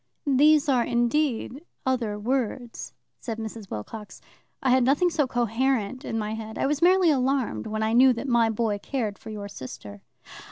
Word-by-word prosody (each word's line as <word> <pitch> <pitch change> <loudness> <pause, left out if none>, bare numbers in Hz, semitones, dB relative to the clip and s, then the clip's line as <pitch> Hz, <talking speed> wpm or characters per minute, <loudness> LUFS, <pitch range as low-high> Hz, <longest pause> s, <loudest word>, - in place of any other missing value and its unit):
"These 295 +2 +4
are 255 -4 +3
indeed 245 +2 0 0.2
'other 240 -5 0
words,'" 240 +1 -3 0.2
said 225 -4 -5
Mrs. 220 -2 -7
Wilcox." 210 - -7 0.4
I 260 - +3
had 255 0 +4
nothing 290 +8 +3
so 295 -4 +1
coherent 245 +1 0
in 225 - -3
my 215 0 -2
head. 220 0 -6
I - - 0
was 290 +2 0
merely 360 -1 +5
alarmed 260 - 0
when 215 0 -2
I 220 +1 0
knew 255 +2 +7
that 235 +4 -5
my 235 -3 +3
boy 220 -2 -1
cared 220 -3 -3
for 225 - -10
your 210 -2 -6
sister." 130 - -9
240 Hz, 170 wpm, -25 LUFS, 220-270 Hz, 0.4 s, knew